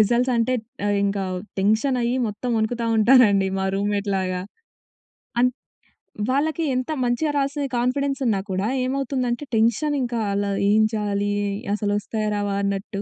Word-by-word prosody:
Results 240 +4 +3
అంటే 230 +2 +1 0.3
అహ్, 205 - +2
ఇంకా 200 -1 -1 0.4
టెన్షన్ 220 +6 +2
అయ్యి, 240 +2 +1
మొత్తం 215 +4 -4
వణుకుతా 230 +2 -1
ఉంటారండి 215 -4 +5
మా 190 - -1
రూమ్‌మేట్ 200 0 -1
లాగా. 185 -1 -1 1.0
అన్ 250 +1 +4 0.8
వాళ్ళకి 310 +5 +1
ఎంత 255 +4 -2
మంచిగా 245 +6 0
రాసిన 280 +1 -1
కాన్ఫిడెన్స్ 275 +3 0
ఉన్నా 200 -3 +2
కూడా 190 +2 0 0.2
ఏమవుతుందంటే, 260 -1 -1
టెన్షన్ 235 +7 +2
ఇంకా 240 -1 -2
అలా 200 0 0 0.2
ఏం 215 +1 +5
చేయాలి? 205 -1 -1 0.4
అసలొస్తాయా? 210 +1 -1
రావా? 205 -1 -1
అన్నట్టు. 200 0 -2
220 Hz, 135 wpm, -23 LUFS, 205-255 Hz, 1.0 s, ఉంటారండి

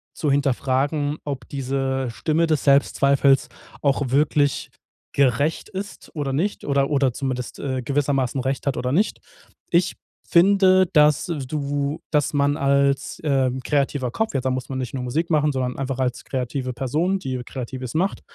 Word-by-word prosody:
zu 150 -3 0
hinterfragen, 140 +2 0
ob 140 -2 -5
diese 135 -1 -2
Stimme 160 +7 0
des 155 -3 +1
Selbstzweifels 140 -1 +3 0.3
auch 140 -2 +1
wirklich 145 0 +1 0.4
gerecht 140 - +1
ist 200 +1 -7
oder 140 -3 -2
nicht 190 +9 -1
oder 140 -1 +1
oder 135 -4 +2
zumindest, 130 -2 -4
äh, 130 -2 -2
gewissermaßen 135 -1 0
recht 135 +1 -2
hat 140 - 0
oder 125 0 -1
nicht. 205 +7 +1 0.5
Ich 170 +1 +2 0.3
finde, 185 +1 +5
dass 150 -1 +4
du 145 -1 -2
dass 150 0 +1
man 145 +1 +2
als, 140 0 +1
ähm, 130 -3 +1
kreativer 140 -2 0
Kopf, 220 +6 -1
ja- 135 - 0
da 130 - -1
muss 130 0 -3
man 130 - -3
nicht 130 0 -4
nur 130 - -3
Musik 155 +7 -1
machen, 150 -2 +3
sondern 130 -2 -2
einfach 135 -1 -3
als 125 -2 -1
kreative 130 0 -3
Person, 155 +10 0
die 130 -4 -4
Kreatives 130 -1 -6
macht- 185 +5 0
140 Hz, 155 wpm, -23 LUFS, 130-150 Hz, 0.5 s, finde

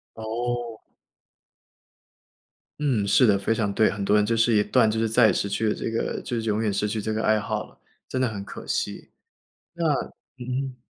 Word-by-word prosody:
哦。 115 +1 -3 2.0
嗯， 125 -9 +1
是 125 - +5
的， 100 -3 +4
非 105 +3 0
常 105 -3 -1
对。 110 - +3
很 105 -2 -4
多 105 +2 +3
人 105 - +3
就 115 +2 +1
是 115 0 +3
一 105 - +5
断 110 +1 +3
就 110 - -1
是 115 - +1
再 115 +1 +5
也 100 - +3
失 100 - -1
去 105 +2 0
了 - - +1
这 - - -3
个 115 - -2
就 120 - -4
是 - - -7
永 105 +1 0
远 105 -3 0
失 105 +1 0
去 110 +1 -2
这 110 +1 -2
个 110 +1 -2
爱 110 0 +3
好 105 - -3
了， - - -24 0.3
真 130 - -2
的 130 - +3
很 105 -3 -5
可 100 - -10
惜。 - - -3 0.6
那 170 0 -3 0.5
嗯。 130 +1 -4
110 Hz, 225 characters per minute, -25 LUFS, 105-120 Hz, 2.0 s, 是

